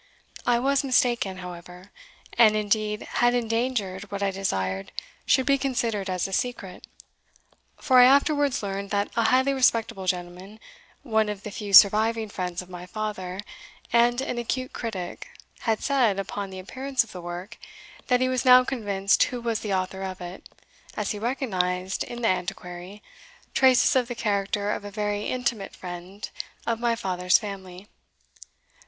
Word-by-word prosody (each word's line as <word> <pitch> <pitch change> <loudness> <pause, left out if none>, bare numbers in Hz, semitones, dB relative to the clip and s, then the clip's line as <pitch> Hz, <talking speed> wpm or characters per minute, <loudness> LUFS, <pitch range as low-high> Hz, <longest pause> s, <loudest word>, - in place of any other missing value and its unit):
I 240 - +4
was 275 +3 +1
mistaken, 240 -7 +1
however, 180 +1 -10 0.4
and 220 -3 +6
indeed 210 0 0
had 240 0 +1
endangered 225 -5 -1
what 200 0 -3
I 195 - +1
desired 95 - -2 0.4
should 260 - +4
be 275 -1 +3
considered 235 -7 -1
as 185 -1 -1
a 195 - -8
secret; 200 -6 -3 0.9
for 255 -2 +5
I 245 - +9
afterwards 280 -1 +3
learned 200 0 -4
that 205 0 -1
a 230 -1 +2
highly 260 +4 +3
respectable 230 -7 +1
gentleman, 180 +3 -4 0.4
one 220 -5 +1
of 205 -1 -5
the 210 - -6
few 205 0 -6
surviving 220 +3 +6
friends 180 -2 -4
of - - -16
my 180 0 -8
father, 195 -2 -4 0.5
and 240 +1 +4
an 250 -3 -3
acute 255 +2 -3
critic, 190 -7 -5 0.3
had 225 -2 -1
said, 250 -8 +2
upon 195 0 -4
the 190 - -9
appearance 260 +8 -1
of 225 - -15
the 180 - -8
work, 175 +6 -7 0.5
that 250 0 +3
he 255 - +3
was 255 -1 0
now 255 -1 +8
convinced 205 -6 0
who 250 - -5
was 230 -2 -1
the 210 - -4
author 190 +1 -3
of 190 -1 -5
it, 180 +1 -9 0.5
as 210 - -1
he 210 - -4
recognised, 190 -7 -1
in 240 0 -7
the - - +3
Antiquary, 180 +1 -4 0.5
traces 260 0 +5
of 250 -2 +2
the 245 - -5
character 205 -1 -1
of - - -3
a 205 - -6
very 205 0 -2
intimate 240 -5 -2
friend* 180 +3 -8 0.3
of 230 -1 -1
my 235 -1 +1
father's 180 -4 +2
family." 195 -2 -8
210 Hz, 160 wpm, -25 LUFS, 190-240 Hz, 0.9 s, I